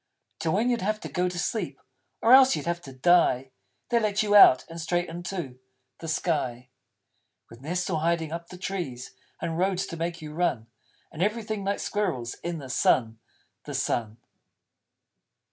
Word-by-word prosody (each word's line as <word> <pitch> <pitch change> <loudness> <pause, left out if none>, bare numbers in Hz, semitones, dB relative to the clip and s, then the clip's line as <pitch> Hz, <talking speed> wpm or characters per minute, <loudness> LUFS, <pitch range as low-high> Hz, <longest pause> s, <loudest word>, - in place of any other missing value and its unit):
Till, 160 - 0
when 230 +6 +2
you'd 235 - 0
have 215 +3 -1
to - - -5
go 180 0 0
to 180 - -7
sleep 220 +5 -2 0.4
Or 230 - +6
else 265 0 +8
you'd - - -5
have 170 0 -2
to 140 - -10
die, 130 -2 +3 0.4
They 240 -1 +3
let 210 -2 +1
you 205 -1 0
Out, 195 -10 +8
and 165 0 -7
straight 175 +2 0
into 170 -6 -6 0.4
The 165 - -7
Sky! 135 -7 -1 0.8
_With 115 - -14
nests 175 +5 -2
all 165 -4 -1
hiding 165 -1 0
up 170 +1 -5
the 180 - -10
Trees, 175 -10 -5 0.3
And 165 0 -3
Roads 190 0 +1
to 165 - -7
make 170 +1 -3
you 150 -1 -8
Run: 155 -9 0 0.5
And 160 - -7
everything 215 0 -1
like 200 +1 0
Squirrels! 160 - -2
In 170 -1 -3
the 140 -4 -8
Sun 115 -3 +2 0.5
the - - -5
Sun! 110 -2 -1
170 Hz, 175 wpm, -27 LUFS, 150-195 Hz, 0.8 s, else